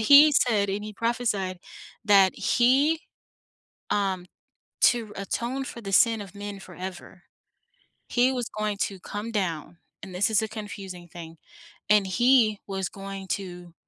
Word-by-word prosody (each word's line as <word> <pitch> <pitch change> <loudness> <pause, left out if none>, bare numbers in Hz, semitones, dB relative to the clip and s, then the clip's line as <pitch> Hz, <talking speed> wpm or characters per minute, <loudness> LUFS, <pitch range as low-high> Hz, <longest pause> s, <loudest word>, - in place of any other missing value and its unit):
he 285 +7 +8
said, 215 -7 +2
and 205 +2 -3
he 215 - -7
prophesied 210 -5 -1 0.5
that 195 -3 +5
he, 275 +6 +3 0.9
um 190 -3 0 0.6
to 230 -4 +3
atone 240 +7 -3
for 235 - -8
the 195 - -6
sin 225 -1 +4
of 195 0 -11
men 205 -1 -6
forever, 185 -1 -9 0.9
he 245 +1 +3
was 245 -2 -3
going 210 -1 -1
to 195 -2 -2
come 205 +4 -6
down, 175 -4 -3 0.2
and 190 - -9
this 195 +4 +1
is 220 0 +3
a 220 - -2
confusing 195 -5 -8
thing, 165 -1 -10 0.5
and 205 -2 +4
he 230 0 +4
was 190 -1 -2
going 195 -1 -8
to 180 -3 -5
205 Hz, 145 wpm, -26 LUFS, 190-230 Hz, 0.9 s, he